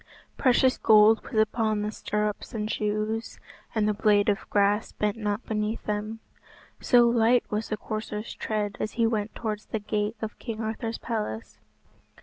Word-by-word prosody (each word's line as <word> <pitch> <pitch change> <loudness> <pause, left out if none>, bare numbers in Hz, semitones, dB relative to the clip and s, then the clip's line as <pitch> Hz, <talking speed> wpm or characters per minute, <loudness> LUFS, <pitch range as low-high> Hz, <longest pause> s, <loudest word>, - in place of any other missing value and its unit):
Precious 255 0 +3
gold 215 0 +6
was - - -8
upon 215 -1 +1
the 210 - -2
stirrups 210 +1 -3
and 215 0 -2
shoes, 215 +2 -2 0.4
and 215 -1 +2
the 210 - +2
blade 205 0 +3
of 200 - -1
grass 205 +1 +2
bent 210 0 -1
not 210 0 -3
beneath 215 0 -2
them, 210 +1 -3 0.6
so 240 -2 +5
light 235 +1 +4
was 215 +1 -2
the 215 - -2
courser's 215 +1 -5
tread 210 -2 -3
as 215 - -3
he 230 - +2
went 220 -2 -1
towards 215 -2 -4
the - - -2
gate 210 +1 -2
of 220 -1 -6
King 225 -3 -5
Arthur's 225 +1 -3
palace. 210 - -4
215 Hz, 160 wpm, -27 LUFS, 210-225 Hz, 0.6 s, gold